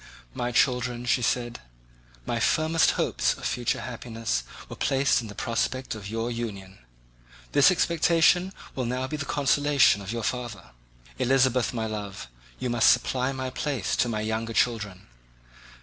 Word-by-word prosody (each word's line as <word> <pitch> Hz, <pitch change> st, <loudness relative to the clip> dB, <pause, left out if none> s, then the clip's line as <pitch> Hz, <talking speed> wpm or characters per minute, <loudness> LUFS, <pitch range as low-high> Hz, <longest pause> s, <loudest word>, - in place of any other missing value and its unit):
"My 120 Hz, 0 st, -2 dB
children," 125 Hz, 0 st, +1 dB
she 125 Hz, +1 st, +2 dB
said, 120 Hz, 0 st, -1 dB, 0.7 s
"my 115 Hz, -, -1 dB
firmest 160 Hz, +5 st, +3 dB
hopes -, -, +1 dB
of -, -, -9 dB
future 120 Hz, -1 st, -1 dB
happiness 115 Hz, -, -3 dB, 0.3 s
were -, -, -8 dB
placed 135 Hz, -1 st, +2 dB
on 115 Hz, -, -8 dB
the 105 Hz, -, -10 dB
prospect 130 Hz, +4 st, -2 dB
of 105 Hz, -3 st, -8 dB
your 115 Hz, +2 st, -2 dB
union. 100 Hz, -5 st, -6 dB, 0.7 s
This 145 Hz, -, +6 dB
expectation 170 Hz, +1 st, +3 dB, 0.2 s
will 130 Hz, -, -2 dB
now 125 Hz, +2 st, -2 dB
be 150 Hz, -, -4 dB
the 140 Hz, -, -4 dB
consolation 145 Hz, -5 st, +3 dB
of 100 Hz, +1 st, -6 dB
your 115 Hz, -1 st, -3 dB
father. 115 Hz, -, -4 dB, 0.5 s
Elizabeth, 130 Hz, -2 st, +2 dB
my 115 Hz, -2 st, -2 dB
love, 105 Hz, -3 st, -5 dB, 0.3 s
you 130 Hz, -, -3 dB
must 120 Hz, -2 st, +4 dB
supply 130 Hz, +1 st, 0 dB
my 130 Hz, -1 st, -4 dB
place 140 Hz, -1 st, -2 dB
to 120 Hz, -, +2 dB
my 110 Hz, -2 st, -2 dB
younger 110 Hz, +1 st, -2 dB
children. 105 Hz, -6 st, 0 dB
120 Hz, 150 wpm, -26 LUFS, 115-130 Hz, 0.7 s, This